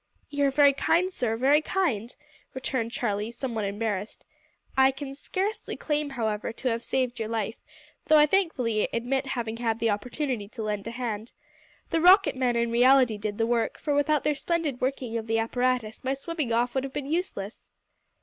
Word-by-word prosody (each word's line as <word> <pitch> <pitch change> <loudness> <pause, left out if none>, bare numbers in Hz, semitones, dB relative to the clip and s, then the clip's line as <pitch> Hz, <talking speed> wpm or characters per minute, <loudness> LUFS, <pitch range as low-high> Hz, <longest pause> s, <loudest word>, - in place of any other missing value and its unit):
"You 285 -1 +1
are - - +3
very 285 0 +5
kind, 355 +6 +1
sir, 225 -6 -1
very 280 +5 +4
kind," 270 - -1 0.4
returned 255 -3 -2
Charlie, 210 -2 -2
somewhat 235 -3 -3
embarrassed. 205 0 -3 0.5
"I 265 0 +6
can 275 0 -6
scarcely 385 +9 -3
claim, 295 -1 -1
however, 220 -6 -2
to 250 +2 -2
have 230 0 -2
saved 250 -2 -1
your 220 -1 -3
life, 220 -1 -2 0.5
though 310 - +6
I 300 - +7
thankfully 280 - +1
admit 265 +4 -1
having 230 -4 -3
had 230 -2 0
the 230 -1 +1
opportunity 240 +1 -3
to 225 +1 -7
lend 210 -1 -3
a - - -2
hand. 230 -2 -4 0.6
The 325 - +2
rocket 375 +1 +6
men, 250 -2 +1
in 235 0 +1
reality, 245 -2 +5
did 205 0 -3
the 225 - +2
work, 230 -1 0
for 295 - -1
without 290 +1 +2
their 300 - +2
splendid 300 -3 -2
working 255 -3 -1
of 225 - -8
the 225 0 +1
apparatus 245 -1 -1
my 265 +1 0
swimming 300 -2 -3
off 240 +1 +1
would 265 - 0
have 270 -1 -6
been 290 - -3
useless." 285 - -4
250 Hz, 185 wpm, -27 LUFS, 225-285 Hz, 0.6 s, I